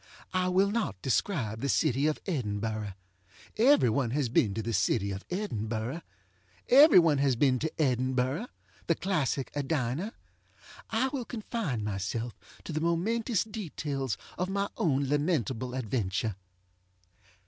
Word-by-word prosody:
I 185 0 +1
will 190 +2 +3
not 215 - -1
describe 120 - 0
the 140 - -1
city 140 +1 +2
of 155 - 0
Edinburgh. 110 - -2 0.6
Every 255 - +5
one 120 +1 +1
has 135 0 0
been 105 -3 +2
to 110 - -2
the 115 +2 -2
city 100 0 +1
of 95 0 -5
Edinburgh. 120 - -3 0.7
Every 285 +2 +8
one 160 -5 +5
has 135 -2 +3
been 130 0 +3
to 160 - -1
EdinburghŌĆöthe 130 - 0 0.5
classic 155 -8 -1
Edina. 145 - -1 0.8
I 230 +4 +1
will 260 -3 -4
confine 215 - -3
myself 105 +3 -3 0.3
to 165 - -6
the 155 - -1
momentous 205 +6 +1
details 150 - -4 0.2
of 180 +1 0
my 200 +1 -1
own 140 -4 +1
lamentable 130 - 0
adventure. 110 -4 -1
140 Hz, 130 wpm, -29 LUFS, 115-185 Hz, 0.8 s, Every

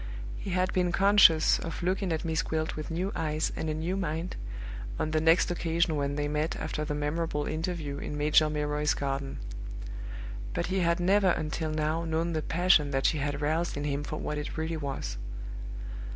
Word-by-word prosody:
He - - -5
had 185 0 +1
been 180 -1 +2
conscious 195 -4 +6
of 165 +1 -5
looking 185 +1 0
at 160 +1 -1
Miss 160 -1 +1
Gwilt 160 0 -2
with 155 -1 -5
new 180 +4 -1
eyes 155 -1 0
and 160 - -2
a - - 0
new 165 +4 -1
mind, 170 -2 -2 0.6
on 155 - -1
the 155 0 +2
next 165 +2 +4
occasion 170 -1 +1
when 140 -1 0
they 145 0 0
met 150 +2 0
after 155 -1 -3
the 150 -1 -2
memorable 150 0 -1
interview 155 -3 -3
in 145 - -4
Major 150 +1 +4
Milroy's 150 0 0
garden; 135 -1 -2 1.2
but - - 0
he 190 - +2
had 170 -1 +2
never 190 +2 +4
until 160 -1 -1
now 155 +1 0
known 165 +1 0
the 155 - 0
passion 165 -3 +4
that 135 -1 0
she 155 - +3
had 145 +1 -2
roused 160 +2 0
in 145 - -2
him 145 0 -1
for 155 - -4
what 150 -1 -3
it 150 - -5
really 160 +1 -1
was. 140 - -4
155 Hz, 190 wpm, -29 LUFS, 150-170 Hz, 1.2 s, conscious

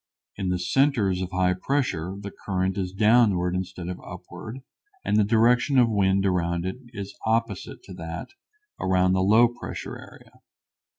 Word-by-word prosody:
In 95 -2 -2
the 90 - +1
centers 100 -2 +2
of 90 - -3
high 90 -1 +2
pressure 95 - -1
the 100 0 -7
current 95 -1 -2
is 95 -2 -2
downward 100 -3 +3
instead 90 -1 -4
of 90 0 -5
upward 120 +5 -9 0.4
and - - +1
the 105 - +5
direction 120 +5 +3
of 120 -2 +5
the - - -2
wind 95 -1 +2
around 85 -2 0
it 95 +5 -3
is 100 -4 -8
opposite 110 -3 -1
to 95 - -11
that 80 -2 -6 0.5
around 95 0 +2
the 95 - +2
low 110 +5 +6
pressure 120 0 -7
area. - - -15
95 Hz, 165 wpm, -25 LUFS, 90-115 Hz, 0.5 s, low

